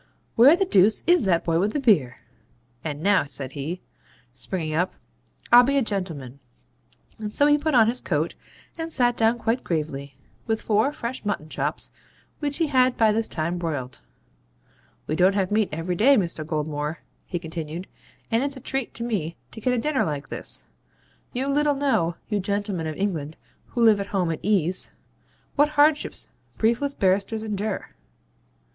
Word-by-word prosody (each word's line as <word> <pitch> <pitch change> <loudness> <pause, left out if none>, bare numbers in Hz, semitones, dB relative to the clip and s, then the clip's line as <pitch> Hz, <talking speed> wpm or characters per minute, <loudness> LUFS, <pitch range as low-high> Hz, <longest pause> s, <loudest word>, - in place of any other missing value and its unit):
Where 265 +8 +8
the 390 +2 +1
deuce 210 - +4
IS 350 -9 +4
that 170 -3 +2
boy 165 -1 +2
with 205 +4 0
the - - 0
beer? 155 - +3 0.7
And 150 -1 -4
now,' 200 -7 +4
said 135 -2 -6
he, 150 +7 -5 0.5
springing 155 +3 -4
up, 175 +4 0 0.6
'I'll 240 - +10
be 275 +3 +2
a 275 - +3
gentleman.' 160 - -4 0.8
And 210 -1 -5
so 285 - +5
he 295 0 +6
put 310 -1 0
on 225 -2 +7
his 240 +3 0
coat, 160 -1 -1 0.5
and 325 0 -4
sat 245 -4 +2
down 225 +1 +2
quite 235 +2 -1
gravely, 140 -4 -3 0.3
with 220 -1 0
four 220 +6 +2
fresh 255 -3 -5
mutton 200 -7 -3
chops - - -3 0.5
which 290 -2 -2
he 330 - +2
had 255 -3 +3
by 220 -1 +4
this 225 +1 0
time 170 +2 -2
broiled. 140 -7 -4 1.0
'We 155 - -2
don't 185 +2 +4
have 195 -1 0
meat 215 -1 +2
every 165 +4 -2
day, 255 +10 +5
Mr. 170 -5 -1
Goldmore,' 150 0 -3 0.2
he 175 - -3
continued, 165 +1 -6 0.5
'and 225 +1 +3
it's 280 0 -2
a - - -7
treat 270 0 -3
to 235 - -3
me 190 -9 -2 0.2
to 220 - -9
get 250 - +1
a 250 - +1
dinner 285 +3 +1
like 145 -2 -4
this. - - -3 0.6
You 260 +3 -2
little 290 +1 +2
know, 265 -12 +1
you 210 -2 -1
gentlemen 200 -3 -2
of 155 - -5
England, 160 -6 -2 0.3
who 240 - -1
live 220 -3 +6
at 200 - -3
home 185 -5 0
at 160 - -4
ease, 185 -3 +2 0.6
what 295 +1 +4
hardships 300 0 +2 0.3
briefless 240 +6 +1
barristers 195 +3 +1
endure.' 210 -1 -3
205 Hz, 175 wpm, -24 LUFS, 165-245 Hz, 1.0 s, I'll